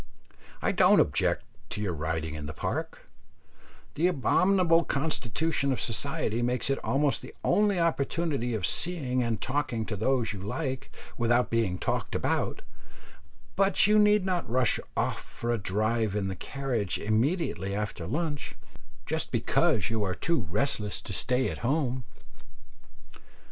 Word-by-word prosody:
I - - +2
don't - - +5
object - - +2 0.3
to - - -4
your 100 -4 -1
riding 80 0 -3
in 75 -1 -6
the 80 - -7
Park - - -4 0.9
the 165 +4 +2
abominable 180 +1 +3
constitution 140 0 -1
of 130 - -1
society 115 0 -1
makes 125 +2 0
it 135 - 0
almost 140 0 +1
the - - -11
only 205 0 +3
opportunity 150 -6 0
of 100 -5 -1
seeing 135 - +2
and 115 -3 -1
talking 130 -4 -1
to 105 - -3
those 115 +2 +1
you 100 - -7
like 130 - -4 0.3
without 120 +1 +2
being 110 -6 +1
talked - - -2
about; - - -1 0.9
but 195 -1 +4
you 210 +1 +5
need 210 -2 +4
not 180 - -1
rush 125 +1 +2 0.2
off - - 0
for 120 - -4
a 120 - 0
drive 110 +2 0
in 100 -2 -1
the 95 - -3
carriage 125 -9 -2
immediately 110 - 0
after 105 +1 -4
lunch, 155 -3 -3 0.5
just - - -1
because - - +2
you 110 -2 0
are 95 -2 -1
too 165 - 0
restless 105 - 0
to - - -6
stay 125 +7 +2
at - - -7
home. 130 -1 0
125 Hz, 145 wpm, -28 LUFS, 105-155 Hz, 0.9 s, don't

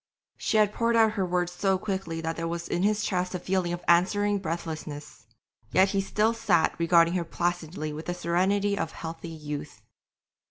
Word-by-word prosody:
She 220 - 0
had 210 -1 +4
poured 230 0 +1
out 225 -1 +5
her 195 -3 -1
words 175 0 0
so 190 +1 +1
quickly 190 -4 -3
that 165 0 -2
there 165 0 -3
was 170 0 -4
in 175 - -1
his 210 +2 +2
chest 185 -1 -1
a - - -2
feeling 185 -1 -1
of 175 0 -4
answering 200 +4 +3
breathlessness, 155 - -6 0.4
yet 190 +1 +4
he 195 0 +1
still 215 +3 +1
sat 170 -7 +2
regarding 170 0 +4
her 180 -2 0
placidly 170 -2 -3
with 155 +2 -7
the 175 - -2
serenity 195 +4 +1
of 165 -5 -3
healthy 165 0 -7
youth. 150 -2 -7
175 Hz, 185 wpm, -27 LUFS, 165-195 Hz, 0.4 s, out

